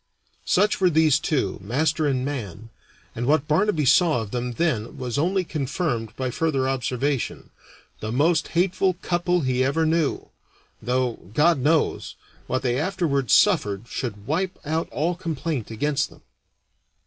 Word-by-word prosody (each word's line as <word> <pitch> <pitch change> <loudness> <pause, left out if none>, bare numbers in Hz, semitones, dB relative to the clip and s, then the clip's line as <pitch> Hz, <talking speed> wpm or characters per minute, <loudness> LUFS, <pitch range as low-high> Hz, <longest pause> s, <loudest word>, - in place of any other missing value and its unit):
Such 205 +2 +2
were 185 - +5
these 155 -3 +4
two, 130 -11 -1
master 150 - 0
and 130 -2 0
man, 115 - -6 0.4
and 120 +2 -3
what 150 0 +2
Barnaby 160 -1 +2
saw 150 -1 +4
of 105 - -10
them 125 0 -3
then 120 -7 -1
was 125 0 -3
only 185 +4 +1
confirmed 135 - -3
by 130 0 -2
further 140 -3 0
observation 135 +1 -2 0.5
the 110 - -4
most 160 +6 +2
hateful 185 +1 +2
couple 175 0 +1
he 130 -2 +1
ever 140 +5 +1
knew; 160 -2 0 0.5
though, 125 -1 -1 0.2
God 160 0 +4
knows, 155 +4 +1 0.3
what 130 +1 -1
they 125 0 +1
afterward 155 - -1
suffered 100 +3 +3
should 105 -4 -5
wipe 180 - -1
out 160 +2 -1
all 165 +4 -1
complaint 160 - -4
against 145 +6 -1
them. - - -19
145 Hz, 145 wpm, -24 LUFS, 125-165 Hz, 0.5 s, were